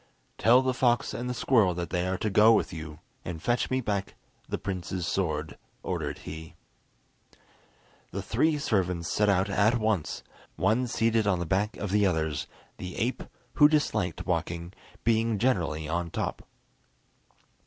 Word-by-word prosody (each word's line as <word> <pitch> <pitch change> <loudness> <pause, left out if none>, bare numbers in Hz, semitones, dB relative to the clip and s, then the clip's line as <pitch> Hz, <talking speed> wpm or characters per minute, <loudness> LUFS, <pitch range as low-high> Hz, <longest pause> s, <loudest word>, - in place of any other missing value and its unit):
"Tell 125 +3 +6
the 130 0 +1
fox 125 0 +1
and 125 +1 -4
the - - -1
squirrel 110 -8 +3
that 85 -1 -4
they 90 0 0
are 95 0 -1
to 105 - -2
go 110 +3 +7
with - - +1
you, 80 -2 -7 0.3
and 85 -2 -5
fetch 120 +8 0
me 130 0 0
back 100 -4 -2 0.3
the - - -1
prince's 95 -2 -4
sword," 80 -6 -2 0.2
ordered - - -3
he. 80 0 -8 1.5
The - - -5
three 155 -1 +2
servants 90 - 0
set 105 0 +3
out 95 0 +3
at 105 +4 +3
once, 110 -9 -1 0.3
one 110 +6 +1
seated 115 -2 +1
on 100 -3 +3
the 85 - -3
back 100 +6 0
of 105 - -4
the 105 0 +4
others, 80 -4 -1 0.3
the 90 -1 -7
ape, 120 +3 -1 0.4
who 150 - +10
disliked 110 - 0
walking, 85 +2 -2 0.3
being 115 -1 +2
generally 85 -10 0
on 85 +2 -2
top. - - -4
100 Hz, 155 wpm, -28 LUFS, 85-115 Hz, 1.5 s, who